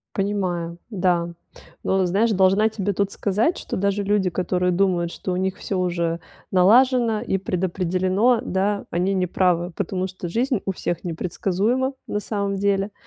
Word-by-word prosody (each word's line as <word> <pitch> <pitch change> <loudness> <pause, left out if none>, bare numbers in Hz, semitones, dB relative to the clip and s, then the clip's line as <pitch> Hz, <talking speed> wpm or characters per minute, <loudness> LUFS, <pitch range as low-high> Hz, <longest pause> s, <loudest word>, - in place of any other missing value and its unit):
Понимаю. 180 -4 -1
Да. 175 -3 0 0.5
Но, 190 -1 +2
знаешь, 205 +6 +2
должна 195 +2 +4
тебе 205 -2 -2
тут 200 +1 0
сказать, 210 - 0
что - - -5
даже 200 +1 0
люди, 200 -2 +1
которые 180 0 0
думают, 175 -2 +1
что 185 - -5
у - - 0
них 190 +1 -1
всё 195 - -3
уже 170 -2 -1 0.3
налажено 225 +3 +4
и 210 -5 0
предопределено, 185 +5 +1
да, 200 -2 -1
они 185 +3 +1
не 185 - +1
правы, 175 -1 +1
потому 185 -1 -2
что 185 -1 -7
жизнь 240 - 0
у 195 - 0
всех 175 -2 -3
непредсказуема 195 +9 -1
на 210 - -1
самом 200 -2 -2
деле, 200 0 +1
190 Hz, 155 wpm, -23 LUFS, 180-205 Hz, 0.5 s, должна